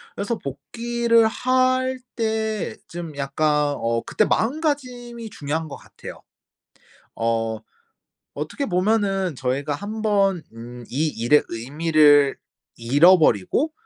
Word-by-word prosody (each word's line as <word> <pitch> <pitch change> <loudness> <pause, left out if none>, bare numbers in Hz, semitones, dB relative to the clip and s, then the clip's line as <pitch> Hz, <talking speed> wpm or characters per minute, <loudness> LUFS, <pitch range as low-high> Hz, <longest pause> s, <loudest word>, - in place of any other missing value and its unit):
그래서 220 +3 -2
복귀를 230 - 0
할 255 +2 +1 0.2
때 220 -2 -2
좀 170 -3 -7
약간 145 +1 +1
어 115 0 -1
그때 215 - +1
마음가짐이 245 -4 -2
중요한 155 +1 -3
것 145 - -8
같아요. - - -12 0.9
어 115 -1 -1 0.8
어떻게 155 - -4
보면은 195 - 0
저희가 135 +4 -2
한번 205 -1 0
음 120 +1 -10
이 150 +6 0
일의 145 +2 +3
의미를 145 +3 +3 0.4
잃어버리고 150 - +3
170 Hz, 215 characters per minute, -22 LUFS, 140-225 Hz, 0.9 s, 일의